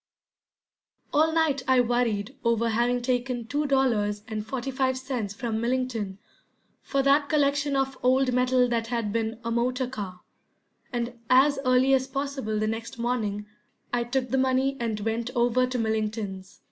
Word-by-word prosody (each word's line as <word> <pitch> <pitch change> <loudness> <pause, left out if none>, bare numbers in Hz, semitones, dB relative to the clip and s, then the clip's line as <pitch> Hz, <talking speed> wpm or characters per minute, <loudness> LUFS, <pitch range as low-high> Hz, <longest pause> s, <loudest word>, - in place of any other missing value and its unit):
All 315 +2 +4
night 320 -4 +2
I 260 -1 +5
worried 240 -1 0
over 235 -1 +2
having 240 +2 +1
taken 245 -1 -1
two 290 +5 -1
dollars 220 -7 +1
and 215 -2 -4
forty 265 +4 -4
five 260 0 0
cents 250 -6 -4
from 225 -2 -2
Millington 235 -5 -1 0.6
for 275 -1 0
that 285 +1 +3
collection 285 -1 +2
of 270 -1 -1
old 255 0 +3
metal 250 0 +3
that 230 -1 -1
had 230 -3 -2
been 225 0 -2
a 230 - -2
motor 250 +2 0
car, 200 -7 -6 0.7
and 240 -1 -3
as 275 +2 +5
early 255 +1 +4
as 260 0 +2
possible 270 -5 -3
the 215 - 0
next 225 +2 -4
morning 220 -4 -1 0.5
I 240 -1 +1
took 250 +1 -1
the 265 - +2
money 265 +1 +2
and 225 -3 -2
went 225 +2 -2
over 245 +1 +3
to 255 0 -3
Millington's. 215 -4 -3
245 Hz, 160 wpm, -26 LUFS, 225-265 Hz, 0.7 s, I